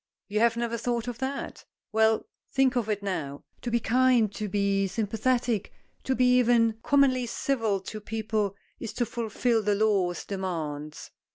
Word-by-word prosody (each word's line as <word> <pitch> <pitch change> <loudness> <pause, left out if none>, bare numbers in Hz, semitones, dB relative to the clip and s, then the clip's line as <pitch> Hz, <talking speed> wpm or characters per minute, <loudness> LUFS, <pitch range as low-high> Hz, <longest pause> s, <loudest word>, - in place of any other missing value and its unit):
You 210 0 -1
have 230 0 +3
never 235 0 -2
thought 240 0 -1
of 240 -1 -5
that? 270 +1 -4 0.3
Well, 220 0 +3 0.3
think 270 -1 +3
of 230 -3 0
it 205 -1 -1
now. 150 -8 -3 0.2
To 245 - -3
be 235 0 +2
kind, 240 -2 +3
to 210 0 -4
be 200 0 +1
sympathetic, 225 +2 0 0.3
to 265 - +1
be 250 0 +4
even 230 -2 +3
Commonly 260 -3 +3
civil 225 -6 0
to 215 +3 -7
people 215 -2 -2 0.2
is 230 - -5
to 245 - 0
fulfil 230 0 0
the 205 0 +1
law's 200 -5 +1
demands." 155 -6 -4
225 Hz, 160 wpm, -27 LUFS, 200-245 Hz, 0.3 s, be